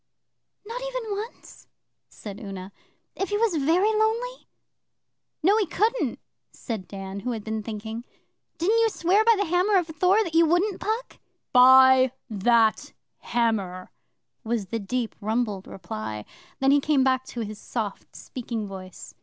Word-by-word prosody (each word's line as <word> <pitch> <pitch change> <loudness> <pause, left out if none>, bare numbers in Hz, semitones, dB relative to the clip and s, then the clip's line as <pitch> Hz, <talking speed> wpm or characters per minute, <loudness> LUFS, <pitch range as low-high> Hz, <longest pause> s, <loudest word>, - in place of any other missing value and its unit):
'Not 470 +4 -6
even - - -4
once?' 435 +4 -9 0.4
said 205 -1 -9
Una. 195 -2 -7 0.4
'If 390 - -2
he 415 - 0
was 430 -6 +1
very 365 +9 +3
lonely?' 460 +4 -1 1.0
'No, 390 +5 +5
he 420 -4 +1
couldn't,' 440 +8 0 0.3
said 220 -7 -6
Dan, 195 0 -7
who 245 +4 -3
had 220 -2 -5
been 220 0 -3
thinking. 220 +2 -6 0.5
'Didn't 420 +7 +2
you 455 0 +4
swear 390 +2 +2
by 460 0 +5
the 405 - +1
Hammer 360 +4 +2
of 355 - +2
Thor 360 +5 +2
that 340 -5 -6
you 330 0 +5
wouldn't, 360 +4 +1
Puck?' 445 +4 -3 0.3
'By 260 0 +7 0.2
that 220 +2 +2 0.3
Hammer!' 205 -6 -1 0.5
was 225 -4 -2
the 230 - -2
deep 230 +3 -3
rumbled 215 -2 -1
reply. 110 - -6 0.3
Then 270 0 +4
he 285 - +5
came 285 -2 +2
back 260 -1 +2
to 240 - -6
his 215 -1 -6
soft 215 -5 -5
speaking 230 -3 -5
voice. 190 -2 -10
260 Hz, 150 wpm, -25 LUFS, -, 1.0 s, By